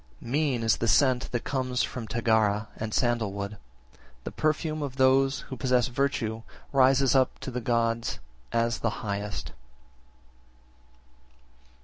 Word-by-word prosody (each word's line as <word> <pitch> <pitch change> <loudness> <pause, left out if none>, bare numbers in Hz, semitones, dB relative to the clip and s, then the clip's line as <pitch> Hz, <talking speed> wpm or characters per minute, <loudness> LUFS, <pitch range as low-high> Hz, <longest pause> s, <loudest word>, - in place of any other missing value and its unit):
56. 115 - -11
Mean 140 -5 +1
is 115 - +3
the 115 - -1
scent 130 -1 +3
that 120 - -2
comes 130 -2 -1
from 120 -3 -5
Tagara 110 -2 +1
and 110 0 -5
sandal 120 -3 +1
wood; 100 +1 -5 0.7
the - - -5
perfume 155 0 -1
of 140 -3 -4
those 135 +1 +3
who 135 - -8
possess 125 -1 +1
virtue 120 -4 -1 0.3
rises 135 -1 +4
up 130 -2 +2
to 130 - -6
the 125 0 -3
gods 115 0 0 0.3
as 115 0 0
the 115 - 0 0.2
highest. 100 -2 -4
120 Hz, 135 wpm, -27 LUFS, 115-135 Hz, 0.7 s, rises